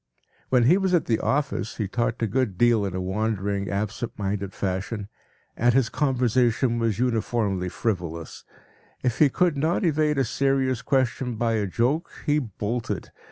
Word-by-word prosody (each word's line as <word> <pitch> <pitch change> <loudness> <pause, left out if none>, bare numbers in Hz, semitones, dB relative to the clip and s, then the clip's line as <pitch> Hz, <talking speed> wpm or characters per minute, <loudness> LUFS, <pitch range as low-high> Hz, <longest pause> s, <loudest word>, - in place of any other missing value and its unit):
When 125 -2 +4
he 170 +11 +5
was 190 -2 +2
at 170 - +1
the 115 -2 +1
office 140 -6 -1
he 105 - -1
talked 115 +3 -1
a - - +2
good 110 -3 -1
deal 120 -2 +4
in 95 -2 -3
a - - -1
wandering, 100 0 -1
absent 105 +3 -3
minded 100 -1 -2
fashion, 100 +2 -3 0.5
and 120 +1 +3
his 135 -3 +3
conversation 125 -3 +1
was 115 -4 0
uniformly 110 -6 0
frivolous. 85 -6 -3 0.6
If 125 -2 0
he 150 - +6
could 175 +3 +2
not 160 +7 +1
evade 155 -2 +2
a 135 - +2
serious 135 0 +1
question 125 -2 0
by 115 +1 0
a 105 -2 0
joke, 125 - 0 0.2
he 150 0 +3
bolted. 115 -1 -4
115 Hz, 160 wpm, -25 LUFS, 100-130 Hz, 0.6 s, he